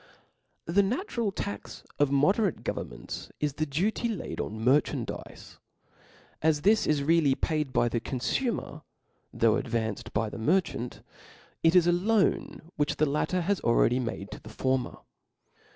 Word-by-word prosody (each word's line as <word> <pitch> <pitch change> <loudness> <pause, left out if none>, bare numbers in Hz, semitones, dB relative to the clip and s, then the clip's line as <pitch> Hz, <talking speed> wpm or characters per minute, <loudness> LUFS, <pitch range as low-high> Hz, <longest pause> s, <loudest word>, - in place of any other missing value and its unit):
The 180 +5 +3
natural 235 - -1
tax 200 +1 -6 0.2
of 145 -1 +4
moderate 185 +8 +2
governments, - - -5
is 150 -2 0
the 155 +2 -2
duty 200 - 0
laid 215 -5 -4
on 110 - -5
merchandizes. 140 +4 -1 0.8
As 155 -1 +2
this 215 +3 +4
is 145 -2 +2
really 155 -3 +3
paid 150 -3 -1
by 120 - +2
the 120 0 -1
confumer, 150 - -2 0.5
though 115 -2 +3
advanced 115 -2 -3
by 105 0 -1
the - - -7
mer 170 +12 +4
chant, 125 -8 -7 0.6
it 165 +2 +4
is 180 -2 +6
a 175 - +4
loan 195 +2 +1
which 145 0 +1
the 155 - +2
latter 150 +5 0
has 195 +3 0
already 120 +1 +3
made 110 -4 -4
to - - -7
the 110 - -11
former. 130 +2 -1
150 Hz, 150 wpm, -28 LUFS, 125-185 Hz, 0.8 s, is